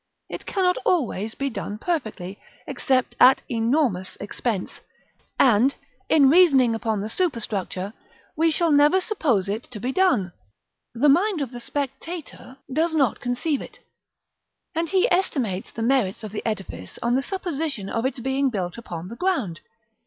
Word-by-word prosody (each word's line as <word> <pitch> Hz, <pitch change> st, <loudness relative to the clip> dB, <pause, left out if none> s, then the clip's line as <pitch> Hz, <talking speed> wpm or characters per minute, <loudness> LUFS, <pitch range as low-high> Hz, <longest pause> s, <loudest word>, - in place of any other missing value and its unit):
It -, -, -7 dB
cannot 365 Hz, -2 st, +1 dB
always 225 Hz, -, 0 dB
be 275 Hz, 0 st, -2 dB
done 210 Hz, -2 st, -5 dB
perfectly, 215 Hz, -, -3 dB, 0.3 s
except 260 Hz, -2 st, 0 dB
at 260 Hz, +1 st, +7 dB
enormous 230 Hz, -, 0 dB
expense; 205 Hz, 0 st, -4 dB, 0.6 s
and, 250 Hz, +2 st, +4 dB, 0.3 s
in 285 Hz, -4 st, +6 dB
reasoning 275 Hz, -7 st, +6 dB
upon 225 Hz, -2 st, -1 dB
the 210 Hz, -, -3 dB
superstructure, 215 Hz, -, -2 dB, 0.4 s
we 325 Hz, +1 st, +3 dB
shall 330 Hz, +1 st, +1 dB
never 295 Hz, +5 st, +5 dB
suppose 290 Hz, -, 0 dB
it 210 Hz, +4 st, -3 dB
to 230 Hz, -4 st, -7 dB
be 250 Hz, +5 st, -2 dB
done. 250 Hz, -, +2 dB, 0.6 s
The 260 Hz, +6 st, +3 dB
mind 355 Hz, +6 st, +4 dB
of 260 Hz, -, -6 dB
the 245 Hz, -, -7 dB
spectator 285 Hz, +1 st, -6 dB, 0.2 s
does 320 Hz, +3 st, +1 dB
not 275 Hz, -6 st, +2 dB
conceive 250 Hz, +4 st, -1 dB
it; -, -, -11 dB, 1.0 s
and 330 Hz, 0 st, -1 dB
he 385 Hz, +4 st, +3 dB
estimates 255 Hz, -, 0 dB
the 225 Hz, -, -4 dB
merits 235 Hz, -5 st, +1 dB
of 215 Hz, -, -6 dB
the 210 Hz, -, -4 dB
edifice 195 Hz, -, -5 dB
on 235 Hz, +1 st, +2 dB
the 265 Hz, -, +2 dB
supposition 315 Hz, -, -3 dB
of 230 Hz, +3 st, -2 dB
its 260 Hz, 0 st, -1 dB
being 265 Hz, +2 st, +1 dB
built 190 Hz, -3 st, -3 dB
upon 175 Hz, -6 st, -7 dB
the 230 Hz, -, -8 dB
ground. 260 Hz, -, -1 dB
255 Hz, 155 wpm, -24 LUFS, 215-315 Hz, 1.0 s, at